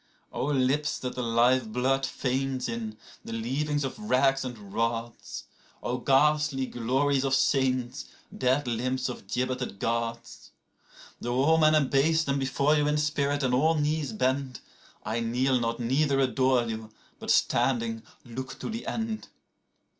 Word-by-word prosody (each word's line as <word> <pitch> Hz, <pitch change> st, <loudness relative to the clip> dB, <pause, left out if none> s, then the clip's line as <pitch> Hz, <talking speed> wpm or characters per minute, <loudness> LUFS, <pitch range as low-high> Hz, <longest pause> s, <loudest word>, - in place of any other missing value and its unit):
43O 135 Hz, -2 st, +1 dB
lips 150 Hz, +3 st, 0 dB
that 125 Hz, -, -4 dB
the 125 Hz, -, -4 dB
live 120 Hz, 0 st, +2 dB
blood 130 Hz, +3 st, +1 dB
faints 130 Hz, 0 st, -2 dB
in, 115 Hz, -2 st, -4 dB, 0.3 s
the -, -, -8 dB
leavings 140 Hz, +6 st, -1 dB
of 135 Hz, -, -4 dB
racks 135 Hz, -9 st, +2 dB
and 105 Hz, -6 st, -8 dB
rods!44O 115 Hz, +2 st, -4 dB
ghastly 150 Hz, -1 st, +3 dB
glories 130 Hz, +3 st, 0 dB
of 135 Hz, -1 st, +2 dB
saints, 130 Hz, 0 st, +1 dB, 0.3 s
dead 130 Hz, +2 st, +1 dB
limbs 125 Hz, +2 st, -1 dB
of 120 Hz, -, -8 dB
gibbeted 125 Hz, -1 st, -2 dB
Gods!45Though 115 Hz, +1 st, -6 dB
all 160 Hz, +2 st, +4 dB
men 155 Hz, 0 st, +5 dB
abase 155 Hz, +2 st, +3 dB
them 140 Hz, -2 st, 0 dB
before 140 Hz, +3 st, +2 dB
you 150 Hz, -1 st, +2 dB
in 150 Hz, 0 st, +2 dB
spirit, 145 Hz, -1 st, 0 dB
and 125 Hz, -1 st, +1 dB
all 155 Hz, +6 st, +3 dB
knees 150 Hz, 0 st, 0 dB
bend,46I 130 Hz, -, -3 dB
kneel 125 Hz, +3 st, +1 dB
not 115 Hz, 0 st, -2 dB
neither 135 Hz, +4 st, +1 dB
adore 130 Hz, -1 st, +3 dB
you, 110 Hz, -1 st, -5 dB, 0.3 s
but -, -, -7 dB
standing, 115 Hz, -3 st, +2 dB, 0.2 s
look 130 Hz, +2 st, -7 dB
to -, -, -5 dB
the 230 Hz, +1 st, -5 dB
end. 225 Hz, -1 st, -3 dB
130 Hz, 140 wpm, -28 LUFS, 120-145 Hz, 0.3 s, men